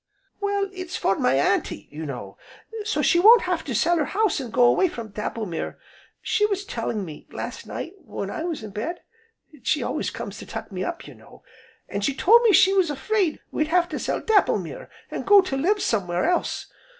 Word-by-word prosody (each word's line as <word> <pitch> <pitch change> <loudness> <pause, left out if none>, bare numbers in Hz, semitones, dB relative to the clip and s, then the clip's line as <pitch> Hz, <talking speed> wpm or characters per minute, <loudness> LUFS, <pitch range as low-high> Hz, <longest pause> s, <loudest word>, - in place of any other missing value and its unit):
"Well, 405 -1 0
it's 370 -1 -5
for 195 - +1
my 130 - +3
Auntie, 140 +8 0
you 155 +1 -6
know, 100 -8 -7 0.5
so 435 +1 -1
she 345 - +4
won't 450 +5 +8
have 360 -2 -1
to 260 -6 -3
sell 345 +9 +3
her 300 - +1
house, 400 -3 0
an' 250 - -6
go 245 - +3
away 305 +10 +5
from 235 -9 -7
Dapplemere. 210 -3 -4 0.5
She 420 - +1
was 400 -1 -2
telling 225 - -3
me, 155 -3 -10
last - - -6
night, 345 - -6
when 200 - -6
I - - -4
was 330 -9 -4
in 215 - -7
bed, 230 - -4 0.6
she 295 - 0
always - - -2
comes - - -7
to - - -10
tuck - - -7
me - - -3
up, - - -5
you - - -11
know, - - -18 0.4
an' 200 - -4
she 265 +7 0
told 455 - +6
me 465 -3 +5
she 380 0 +6
was 380 -4 +3
'fraid 340 +4 0
we'd 305 - 0
have 345 +1 +2
to 305 - -4
sell - - -1
Dapplemere 440 -2 +1 0.2
an' - - -3
go 410 0 +7
to 370 -8 -3
live 370 +10 +1
somewhere 185 - 0
else. 355 0 0
320 Hz, 205 wpm, -24 LUFS, -, 0.6 s, won't